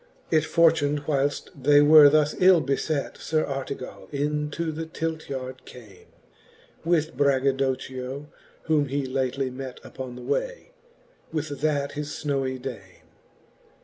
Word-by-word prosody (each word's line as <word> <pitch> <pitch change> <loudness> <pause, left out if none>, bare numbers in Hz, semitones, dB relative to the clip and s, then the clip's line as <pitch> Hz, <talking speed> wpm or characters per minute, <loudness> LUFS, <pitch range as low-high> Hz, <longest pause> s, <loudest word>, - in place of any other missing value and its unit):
X. 160 -1 +3
It - - -10
fortun'd 155 -3 +3
whyleft 145 -1 -1
they 145 +1 +4
were 145 0 +9
thus 150 0 +2
ill 185 -1 +7
befet. 140 +1 -2
Sir 155 -1 0
Artega// 135 -1 -6
into 150 +2 -2
the 160 +1 -5
Tilt 160 -1 -4
yard 130 -1 -6
came, 110 -7 -14 0.8
With 160 -4 +1
BraggadocchiOj 135 0 0 0.4
whom 150 -3 +2
he 140 +1 -2
lately 130 0 -1
met 130 0 -7
Upon 130 -2 -8
the 125 - -9
way, - - -3 0.6
with 155 -1 -2
that 145 -2 0
his 150 0 -5
fnowy 135 -4 -2
dame. 115 -9 -9
145 Hz, 130 wpm, -25 LUFS, 130-155 Hz, 0.8 s, were